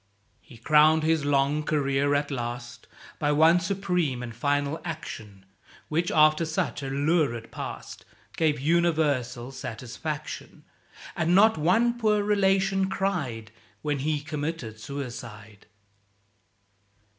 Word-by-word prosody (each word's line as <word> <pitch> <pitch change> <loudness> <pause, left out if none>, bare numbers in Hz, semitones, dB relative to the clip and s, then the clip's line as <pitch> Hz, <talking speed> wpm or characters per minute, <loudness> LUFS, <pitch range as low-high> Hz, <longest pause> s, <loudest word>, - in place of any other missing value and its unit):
"[A]) 105 +3 -38
He 125 -6 -13
crowned 155 +5 +4
his 160 -2 +1
long 145 +1 +2
career 145 -2 +1
at 145 0 -1
last 120 -2 -5 0.3
By 145 - +1
one 160 +4 +5
supreme 180 -8 -1
and 115 -2 -7
final 145 +4 -1
action, 110 - -7 0.4
Which, 165 +3 0
after 155 +1 +4
such 160 -2 -2
a 135 - -4
lurid 140 -5 0
past, - - -7 0.3
Gave 155 -3 +1
universal 150 -6 +1
satisfaction; 130 +5 -6 0.5
And 170 +3 +2
not 220 +3 +6
one 230 +10 +2
poor 210 -2 +2
relation 195 -1 +2
cried 145 - -2 0.3
When 145 -2 -1
he 150 +1 -1
committed 145 -7 -5
suicide. 115 -6 -8
150 Hz, 115 wpm, -26 LUFS, 125-165 Hz, 0.5 s, not